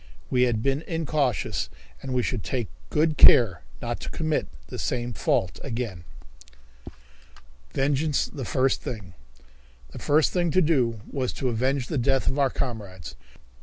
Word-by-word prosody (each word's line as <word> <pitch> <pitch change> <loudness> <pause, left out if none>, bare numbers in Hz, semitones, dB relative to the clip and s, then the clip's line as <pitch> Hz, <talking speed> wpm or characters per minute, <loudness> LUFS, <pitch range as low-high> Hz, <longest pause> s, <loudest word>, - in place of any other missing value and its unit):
We 125 0 +4
had 110 -2 -1
been 135 +2 +1
incautious, 140 - -1 0.3
and 135 - -6
we 125 -1 +1
should 120 -4 -2
take 120 -5 -2 0.2
good 155 0 +1
care 95 -10 +7 0.2
not - - -2
to - - -6
commit 155 -2 -1 0.2
the - - -7
same 120 -1 -2
fault 95 -2 0
again. 115 -9 -4 1.7
Vengeance 145 +2 +1
the 140 - -7
First 130 +2 +1
Thing! 100 -7 -6 0.8
The - - -8
first 150 0 +3
thing 175 -2 +2
to 185 +4 +3
do 125 -9 +1
was 130 -3 -2
to 130 - -1
avenge 130 +3 0
the 145 +1 -2
death 135 +2 +1
of 140 - +1
our 135 -1 +4
comrades. 100 - -5
130 Hz, 150 wpm, -26 LUFS, 115-145 Hz, 1.7 s, care